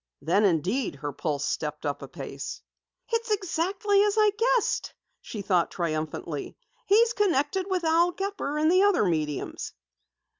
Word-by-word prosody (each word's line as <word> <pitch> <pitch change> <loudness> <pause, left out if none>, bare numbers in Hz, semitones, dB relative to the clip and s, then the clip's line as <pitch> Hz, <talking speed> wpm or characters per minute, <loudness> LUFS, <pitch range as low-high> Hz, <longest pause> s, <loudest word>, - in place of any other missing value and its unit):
Then, 195 +7 +2
indeed, 190 - +1
her 145 +1 -5
pulse 145 -2 -2
stepped 150 0 -3
up 145 0 -2
a - - -7
pace. - - -7 0.5
"It's 460 0 -1
exactly 395 +1 +1
as 415 0 +2
I 425 -1 +5
guessed!" 470 +1 +1 0.3
she 210 -3 -6
thought 180 -3 +2
triumphantly. 155 -2 -4 0.3
"He's 455 +3 +5
connected 370 -2 +1
with 370 -2 0
Al 330 +2 +4
Gepper 385 -6 -3
and 310 +2 +3
the 370 +1 +5
other 400 - +4
mediums!" 155 -5 -2
315 Hz, 145 wpm, -27 LUFS, -, 0.5 s, I